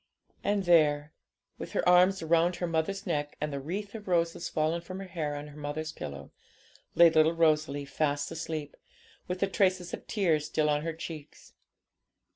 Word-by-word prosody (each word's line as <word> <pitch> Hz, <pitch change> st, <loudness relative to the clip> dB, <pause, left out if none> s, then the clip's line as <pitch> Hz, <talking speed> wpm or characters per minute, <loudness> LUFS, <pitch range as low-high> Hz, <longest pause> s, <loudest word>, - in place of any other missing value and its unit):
And 205 Hz, -1 st, +1 dB
there, 150 Hz, -4 st, +3 dB, 0.5 s
with -, -, -7 dB
her -, -, 0 dB
arms 180 Hz, +1 st, +5 dB
round 170 Hz, +2 st, +3 dB
her 175 Hz, -, -2 dB
mother's 170 Hz, +4 st, -1 dB
neck, 145 Hz, -5 st, -2 dB
and 150 Hz, -1 st, -3 dB
the 140 Hz, -, -3 dB
wreath 195 Hz, +8 st, -5 dB
of 215 Hz, -3 st, -9 dB
roses 170 Hz, -2 st, 0 dB
fallen 160 Hz, +2 st, 0 dB
from 185 Hz, +2 st, -8 dB
her 195 Hz, -, -6 dB
hair 160 Hz, -6 st, -3 dB
on 145 Hz, +1 st, -7 dB
her 145 Hz, -, -13 dB
mother's 150 Hz, +2 st, -4 dB
pillow, 70 Hz, -1 st, -8 dB, 0.6 s
lay 170 Hz, -1 st, +7 dB
little 155 Hz, +1 st, +4 dB
Rosalie, 155 Hz, -3 st, +2 dB
fast 145 Hz, +1 st, -1 dB
asleep, 160 Hz, -2 st, -5 dB, 0.5 s
with 180 Hz, +1 st, -4 dB
the 195 Hz, -, +3 dB
traces 185 Hz, -2 st, +1 dB
of -, -, -7 dB
tears 160 Hz, -8 st, +1 dB
still 150 Hz, -1 st, +1 dB
on 145 Hz, 0 st, +1 dB
her 165 Hz, +1 st, -3 dB
cheeks. 155 Hz, -2 st, -9 dB
160 Hz, 175 wpm, -29 LUFS, 150-180 Hz, 0.6 s, lay